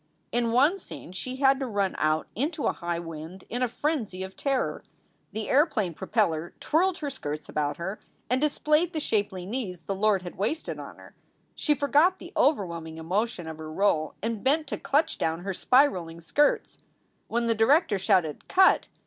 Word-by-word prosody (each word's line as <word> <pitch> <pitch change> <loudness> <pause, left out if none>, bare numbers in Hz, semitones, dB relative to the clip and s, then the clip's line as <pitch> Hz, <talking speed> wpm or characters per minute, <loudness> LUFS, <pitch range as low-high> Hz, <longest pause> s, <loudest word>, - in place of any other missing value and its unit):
In 235 -1 +1
one 285 +11 +4
scene 180 - -10
she 250 +8 -4
had 270 0 +4
to 265 - -2
run 200 -4 0
out 155 0 +1
into 295 +5 -2
a - - +3
high 170 -1 -3
wind 165 +2 -8
in 245 +2 -2
a 250 - +3
frenzy 235 - -2
of 190 0 -8
terror. 275 -2 -1 0.5
The 215 0 -4
airplane 255 - +2
propeller 175 -3 -1
twirled 360 +3 +2
her 290 -2 -4
skirts 150 - -5
about 145 -1 -1
her 190 +5 -4 0.3
and 255 +3 +1
displayed 305 +3 +2
the 315 - -1
shapely 205 -9 -1
knees 195 -5 -4
the 195 - -3
Lord 195 -1 +2
had 175 - -9
wasted 235 +11 -2
on - - -8
her. - - -15 0.4
She 295 - +1
forgot 295 +7 +3
the 345 - -11
overwhelming 170 - 0
emotion 180 +2 -2
of 160 -1 -7
her 155 0 -7
role 155 -4 +1
and 225 -2 -2
bent 300 +4 +2
to - - -3
clutch 310 +3 +1
down 160 +1 -1
her 195 +1 -3
spiraling 180 - +2
skirts. 290 - +1 0.5
When 235 +1 0
the 230 - +3
director 225 - +3
shouted 175 -5 +1
"Cut!" 380 0 +5
215 Hz, 180 wpm, -27 LUFS, 175-280 Hz, 0.5 s, Cut